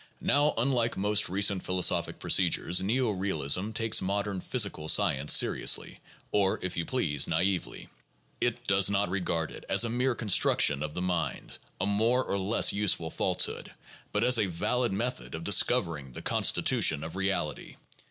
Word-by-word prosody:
Now, 145 +1 +2
unlike 120 -1 0
most 105 +1 +2
recent 95 0 +1
philosophic 90 -1 0
procedures, 90 +2 +2
neo 115 +4 0
realism 95 -1 -2
takes 115 0 0
modern 100 0 -3
physical 100 -11 -1
science 75 -9 +2
seriously, - - +1 0.3
or, 100 -2 +1
if 90 -1 -3
you 85 - -3
please, 80 - 0
naively. 90 +3 -2 0.5
It - - -2
does - - +4
not 100 -1 0
regard 85 -4 -2
it - - -11
as - - +4
a 115 - -2
"mere 125 +1 0
construction 90 -9 +2
of 75 0 -5
the 90 - -3
mind," 85 -7 -4 0.2
a 90 - -1
more 115 +5 +1
or 100 - -3
less 100 +5 +2
useful 100 -6 0
falsehood, - - -1 0.4
but 105 - 0
as 125 -1 +4
a 100 - +1
valid 120 +8 -1
method 120 +3 -4
of 80 - -7
discovering 85 - +1
the - - -8
constitution 75 - +2
of 80 +2 -7
reality. 95 -5 -3
100 Hz, 155 wpm, -28 LUFS, 85-115 Hz, 0.5 s, does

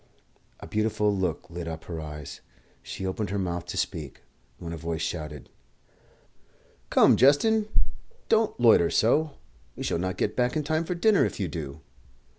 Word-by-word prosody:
A - - -9
beautiful 105 -1 +1
look 95 -1 -2
lit 85 0 -5
up 80 -1 -6
her 85 -2 -6
eyes; 75 -2 -8 0.4
she 95 - -6
opened 95 +1 -2
her 100 - -2
mouth 90 -2 -3
to - - -5
speak, 75 -5 -3 0.3
when 85 -1 -6
a - - -3
voice 80 0 -3
shouted 75 -3 -5 1.4
"Come, - - +6
Justin; 210 +11 +4 0.6
don't 220 - +2
loiter 110 -8 +6
so. 145 +6 +2 0.4
We - - -6
shall - - 0
not 95 +1 -2
get 105 - -1
back 125 +2 +1
in 155 - 0
time 155 +2 0
for 180 - -2
dinner, 200 +3 +4
if - - -2
you 95 - 0
do." 75 -2 -6
95 Hz, 165 wpm, -27 LUFS, 85-135 Hz, 1.4 s, Come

